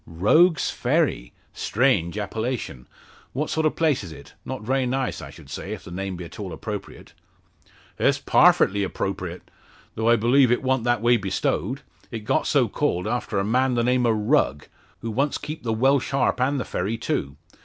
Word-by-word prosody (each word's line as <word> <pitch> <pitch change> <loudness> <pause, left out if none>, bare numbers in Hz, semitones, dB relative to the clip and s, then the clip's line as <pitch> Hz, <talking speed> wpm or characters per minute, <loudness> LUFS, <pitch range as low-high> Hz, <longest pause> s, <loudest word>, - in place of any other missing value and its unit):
"Rogue's 140 - +3
Ferry? - - 0 0.2
Strange 105 -7 +1
appellation! 105 - -4 0.5
What 150 +4 -2
sort 160 0 +2
of - - -2
place 155 -8 +1
is 85 - -8
it? 75 -2 -13
Not - - -6
very 130 +2 0
nice, 130 +1 -2
I - - -8
should - - -14
say 95 +9 -6
if 110 - -8
the - - -11
name 95 +1 -4
be 90 0 -7
at 85 - -12
all 95 -3 -5
appropriate." 105 +5 -7 0.9
"It's - - +3
parfitly 100 +1 +4
'propriate, 95 -2 -4 0.5
though 110 +1 0
I 120 - +6
b'lieve 120 +3 +4
it 120 - +1
wa'nt 130 -2 +1
that 120 -2 +2
way 120 0 +5
bestowed. 100 - -2 0.3
It 115 -2 -5
got - - +1
so - - +3
called 90 +1 -1
after 115 -2 -2
a 95 - +1
man 125 +3 +2
the 120 - +1
name 125 0 +2
o' - - +4
Rugg, 105 - +1 0.4
who 115 - -4
once 140 +6 0
keeped 150 -2 -7
the 115 - -1
Welsh 130 +4 +2
Harp 135 -2 +1
and 135 +2 +1
the - - -3
ferry 100 +6 -2
too. 70 -10 -2
115 Hz, 185 wpm, -24 LUFS, 95-130 Hz, 0.9 s, I